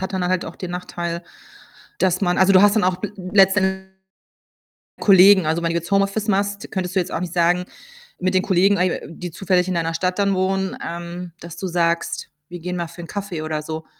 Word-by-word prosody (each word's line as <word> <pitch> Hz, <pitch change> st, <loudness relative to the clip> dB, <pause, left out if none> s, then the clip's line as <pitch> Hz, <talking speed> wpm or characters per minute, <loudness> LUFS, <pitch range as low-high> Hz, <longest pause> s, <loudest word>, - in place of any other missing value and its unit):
hat 190 Hz, +1 st, -4 dB
dann 185 Hz, -1 st, -1 dB
halt 185 Hz, 0 st, 0 dB
auch -, -, -9 dB
den 180 Hz, -2 st, -6 dB
Nachteil, 175 Hz, -1 st, -4 dB, 0.8 s
dass 185 Hz, +1 st, +1 dB
man 180 Hz, -2 st, +1 dB
also, 190 Hz, +1 st, +5 dB
du 190 Hz, +1 st, +7 dB
hast 205 Hz, +1 st, +5 dB
dann 210 Hz, -, +3 dB
auch 185 Hz, -1 st, +1 dB
bel 205 Hz, +2 st, -5 dB
letztend 190 Hz, 0 st, +2 dB, 1.1 s
Kollegen. 195 Hz, -2 st, +6 dB
Also, 160 Hz, +2 st, 0 dB
wenn 170 Hz, -, +1 dB
du 165 Hz, -, -2 dB
jetzt 170 Hz, +3 st, -3 dB
Homeoffice 200 Hz, +2 st, +1 dB
machst, 200 Hz, 0 st, -1 dB
könntest 185 Hz, -1 st, -3 dB
du -, -, +4 dB
jetzt 180 Hz, 0 st, -2 dB
auch -, -, -1 dB
nicht 175 Hz, -2 st, -4 dB
sagen 175 Hz, +1 st, +2 dB, 0.5 s
mit 185 Hz, +1 st, 0 dB
den 185 Hz, -, +3 dB
Kollegen, 195 Hz, +1 st, +3 dB
äh, 180 Hz, -1 st, 0 dB
die 175 Hz, +1 st, -7 dB
zufällig 185 Hz, 0 st, +1 dB
in 185 Hz, -, -1 dB
deiner 165 Hz, -1 st, -1 dB
Stadt 180 Hz, +3 st, -1 dB
dann 200 Hz, -1 st, +2 dB
wohnen, 190 Hz, +1 st, -1 dB
ähm, 170 Hz, +1 st, -6 dB
dass 170 Hz, -1 st, -9 dB
du 190 Hz, -, -4 dB
sagst: 170 Hz, -1 st, -1 dB, 0.2 s
„Wir 175 Hz, 0 st, -8 dB
gehen 180 Hz, +2 st, -4 dB
mal 170 Hz, -1 st, -3 dB
für 170 Hz, +1 st, -11 dB
'n 170 Hz, -, -9 dB
Kaffee“, 200 Hz, -5 st, -5 dB
oder 155 Hz, -1 st, -3 dB
so? 160 Hz, +1 st, -6 dB
180 Hz, 220 wpm, -21 LUFS, 170-190 Hz, 1.1 s, du